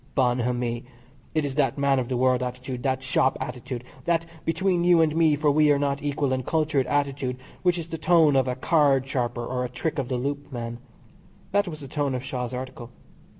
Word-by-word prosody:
Bonhomie! 120 -1 0 0.5
It 155 -2 +2
is 140 - -3
that 140 0 +1
man 140 -1 +3
of 125 - -2
the 125 - 0
world 130 0 +3
attitude, 125 0 -4
that 130 -1 -1
shop 130 0 +2
attitude, 125 0 -5 0.2
that 165 -1 +1 0.2
between 175 +2 +1
you 175 -1 +5
and 160 -1 +3
me 160 -2 +4
for 150 +1 +2
are - - +5
we 150 0 +4
not 140 0 -1
equal 145 -2 0
and 130 0 -1
cultured 155 -2 +1
attitude, 140 -3 -1 0.2
which 180 -1 +2
is 165 -2 -5
the 165 - -5
tone 160 -4 +4
of 130 -1 +3
a 125 - -1
card 140 -1 +3
sharper 120 -3 -2
or 125 +1 -2
a 125 - -3
trick 140 +5 -3
of 135 - -2
the 125 - 0
loop 140 +3 -3
man. 120 -1 -5 0.7
That 200 0 +2
was 155 -3 -6
the 140 - -7
tone 140 -1 -1
of 125 - -4
Shaw's 125 -2 -4
article. 130 -2 -6
135 Hz, 210 wpm, -25 LUFS, 125-150 Hz, 0.7 s, you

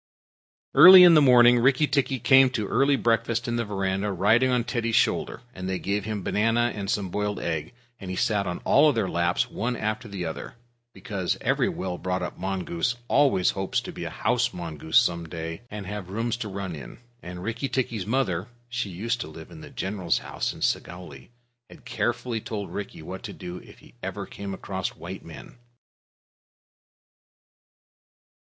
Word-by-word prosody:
Early 185 0 +11
in 175 -1 +8
the 155 - +7
morning 120 -2 +6
Rikki 135 +4 +4
tikki 140 -2 0
came 130 +2 +6
to 105 - -2
early 140 +5 +3
breakfast 115 0 0
in 120 0 -1
the 120 - 0
veranda 95 0 -2
riding 105 +7 +3
on 125 -2 +1
Teddy's 115 -2 -1
shoulder, 120 - +1
and 95 0 -6
they 95 - -1
gave 100 +1 -2
him 105 -3 -4
banana 115 +4 +1
and 100 -2 -5
some 100 -3 -1
boiled 105 +1 -2
egg. 85 +8 -4 0.2
He 95 -2 -5
sat 100 0 0
on 90 - -4
all 150 +2 +5
their 115 -5 0
laps 85 0 0
one 120 +3 -2
after 110 +1 -3
the 100 -4 -5
other, 80 +7 -6 0.4
because 100 -8 -3
every - - +1
well 90 -1 -4
brought 90 0 -2
up 90 - -5
mongoose 95 +3 -2
always 135 -12 +3
hopes 95 -1 -1
to - - -8
be - - -7
a - - -4
house 120 +1 0
mongoose 80 -3 -1
some 85 -2 +2
day 80 +2 -6
and 105 -1 -7
have 100 -2 -6
rooms 115 +4 -2
to 115 - -5
run 95 -2 -5
about 70 - -8
in; - - -12 0.2
and 90 +1 -8
Rikki 115 +6 -3
tikki's 115 -7 -2
mother 105 -7 0 0.2
(she 120 -4 -3
used 115 +7 -3
to - - -5
live 80 - -11
in - - -11
the - - -10
general's 95 -3 -1
house - - -3
at - - -7
Segowlee) 85 -7 -3 0.4
had - - -16
carefully 120 -1 -2
told 105 -2 -6
Rikki 100 -5 -6
what 95 +3 -7
to - - -7
do 90 0 -8
if - - -15 0.2
ever - - -5
he - - -22
came 100 -1 -6
across 95 0 -4
white 95 +3 -8
men. 85 +9 -12
105 Hz, 180 wpm, -25 LUFS, 90-120 Hz, 0.4 s, Early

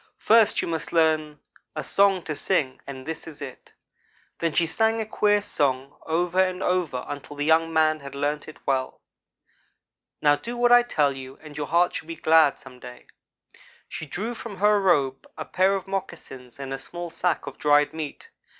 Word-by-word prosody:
First 220 -1 +4
you - - -3
must 165 -2 -3
learn 155 -2 +2 0.4
a 155 - -3
song 195 +4 +3
to 155 - -4
sing, 145 -6 0
and 130 -2 -8
this 160 0 -6
is 155 -2 -10
it.' 140 -3 -9 0.7
Then 165 -1 0
she 170 - +3
sang 220 +7 +1
a 220 - -2
queer 205 -1 +2
song 135 -5 -1
over 175 +3 +1
and 185 0 -3
over 175 -8 0
again - - -8
until 145 +1 -12
the 145 0 -2
young 165 +1 +3
man 155 -1 +2
had 140 -1 -10
learned 145 +1 -2
it 155 - -11
well. 130 -1 -1 1.2
"'Now 145 -1 +4
do 240 +7 -7
what 240 0 +3
I 245 0 +8
tell 150 -12 +1
you, 135 0 -9
and 155 -1 -11
your 145 -1 -4
heart 175 +1 +2
shall 160 - -5
be 165 - -5
glad 160 -2 +4
some 130 -2 -13
day.' 125 0 -11 0.8
She 160 - -7
drew 215 - -4
from 225 -4 -8
her 210 +1 +3
robe 140 -8 +1
a 155 - -5
pair 190 +2 +2
of 190 - -4
moccasins 150 -10 -7
and 135 -1 -5
a 135 - -4
small 175 +4 -7
sack 175 0 -1
of - - -9
dried 145 0 +3
meat. 160 - -7
160 Hz, 195 wpm, -25 LUFS, 145-185 Hz, 1.2 s, I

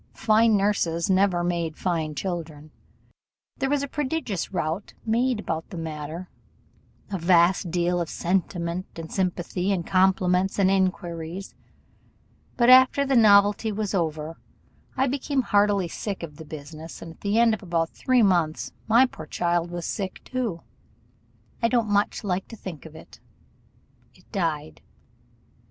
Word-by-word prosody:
Fine 220 0 +4
nurses 195 -3 +1
never 185 -2 +3
made 170 -2 -2
fine 160 -4 -2
children. 160 -4 -5 0.9
There 270 - -1
was 285 0 +1
a - - -2
prodigious 260 - -3
rout 170 +1 -3
made 235 +1 +1
about 165 -5 -4
the 185 - -8
matter; 160 +2 -6 0.8
a 195 - -2
vast 175 +1 +3
deal 175 +1 0
of 170 - -3
sentiment 175 0 -2
and 165 -1 -8
sympathy, 180 0 -1
and 180 -4 -1
compliments 185 0 +2
and 190 -1 +3
inquiries; 180 -1 -2 1.0
but 240 - +4
after 260 +2 +7
the 270 -1 +1
novelty 205 -1 +5
was 210 -1 -3
over, 160 -3 -2 0.6
I 265 - +3
became 275 0 -1
heartily 205 -4 +2
sick 195 +2 -5
of 150 -3 -8
the 160 - -10
business; 155 +2 -9
and 165 - -9
at - - -27
the 205 +2 0
end 230 -1 +5
of 220 - -3
about 170 -3 -1
three 255 -2 +2
months 170 -6 +1
my 235 +4 +6
poor 160 -11 -9
child 175 +1 0
was 175 -1 -5
sick 190 -2 -4
too 230 -10 -3 1.0
I 230 - +4
don't 235 -3 +1
much 205 +2 +1
like 190 -2 -2
to 230 - -10
think 170 -7 -8
of 160 - -15
it 160 - -14 1.0
it - - -22
died. 160 - -2
185 Hz, 145 wpm, -25 LUFS, 170-210 Hz, 1.0 s, after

